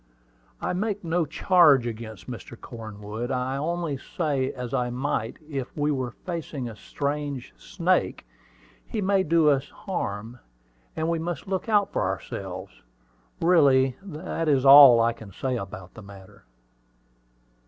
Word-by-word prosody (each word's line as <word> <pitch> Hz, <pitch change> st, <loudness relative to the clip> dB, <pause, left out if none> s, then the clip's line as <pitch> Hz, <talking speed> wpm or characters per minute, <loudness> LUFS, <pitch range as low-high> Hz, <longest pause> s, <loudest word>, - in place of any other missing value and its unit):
"I -, -, -1 dB
make 205 Hz, +2 st, -2 dB
no 165 Hz, -1 st, 0 dB
charge 155 Hz, -7 st, +5 dB
against 110 Hz, -3 st, -7 dB, 0.4 s
Cornwood; 110 Hz, +1 st, -7 dB
I 130 Hz, 0 st, -1 dB
only 165 Hz, 0 st, -2 dB
say, 140 Hz, -4 st, -2 dB
as 125 Hz, -1 st, -7 dB
I 125 Hz, -2 st, 0 dB
might 120 Hz, -2 st, -2 dB
if 135 Hz, -3 st, -5 dB
we 150 Hz, 0 st, +1 dB
were 130 Hz, -3 st, -2 dB
facing 155 Hz, -2 st, -6 dB
a 115 Hz, -, -8 dB
strange 140 Hz, +1 st, -4 dB
snake, 180 Hz, -, -1 dB, 0.6 s
he 220 Hz, -, -3 dB
may 195 Hz, -1 st, +2 dB
do 165 Hz, -3 st, +3 dB
us 140 Hz, 0 st, 0 dB
harm, 115 Hz, -, -5 dB, 0.6 s
and 160 Hz, -, -1 dB
we 165 Hz, 0 st, 0 dB
must 170 Hz, -1 st, -4 dB
look 190 Hz, +3 st, -3 dB
out 205 Hz, -2 st, +2 dB
for -, -, 0 dB
ourselves. 95 Hz, -9 st, -5 dB, 0.6 s
Really, 135 Hz, -7 st, +4 dB
that 165 Hz, -3 st, -4 dB
is 140 Hz, -2 st, +2 dB
all 135 Hz, -3 st, +10 dB
I 115 Hz, 0 st, +3 dB
can 110 Hz, -3 st, -12 dB
say 130 Hz, +5 st, -2 dB
about 95 Hz, -4 st, -7 dB
the 110 Hz, -, -11 dB
matter." 95 Hz, -, -14 dB
135 Hz, 140 wpm, -25 LUFS, 120-165 Hz, 0.6 s, all